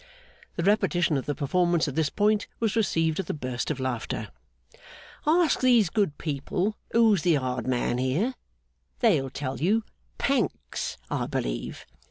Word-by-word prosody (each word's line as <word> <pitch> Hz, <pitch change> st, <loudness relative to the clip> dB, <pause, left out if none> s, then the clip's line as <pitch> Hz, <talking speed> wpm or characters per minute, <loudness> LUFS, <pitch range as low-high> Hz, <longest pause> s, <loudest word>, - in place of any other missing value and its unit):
(The 170 Hz, -, -2 dB
repetition 175 Hz, -5 st, +2 dB
of 135 Hz, -, -2 dB
the 145 Hz, -, -1 dB
performance 170 Hz, +3 st, +1 dB
at 145 Hz, -, -3 dB
this 155 Hz, 0 st, +1 dB
point 210 Hz, 0 st, +1 dB
was 225 Hz, -2 st, 0 dB
received 165 Hz, -7 st, +1 dB
with 190 Hz, -, -3 dB
a -, -, -1 dB
burst 130 Hz, -4 st, -3 dB
of 150 Hz, -3 st, -2 dB
laughter.) 120 Hz, -4 st, -3 dB, 1.0 s
'Ask 325 Hz, 0 st, +4 dB
these 240 Hz, -8 st, +4 dB
good 200 Hz, -10 st, 0 dB
people 165 Hz, +7 st, -2 dB, 0.2 s
who's 225 Hz, -6 st, +4 dB
the 170 Hz, -1 st, +3 dB
hard 130 Hz, -3 st, -2 dB
man 125 Hz, -1 st, 0 dB
here. 150 Hz, -, 0 dB, 0.7 s
They'll 160 Hz, -, +3 dB
tell 135 Hz, 0 st, -4 dB
you 210 Hz, +8 st, +2 dB, 0.3 s
Pancks, -, -, -1 dB
I -, -, -1 dB
believe. -, -, -3 dB
165 Hz, 150 wpm, -27 LUFS, 135-210 Hz, 1.0 s, Ask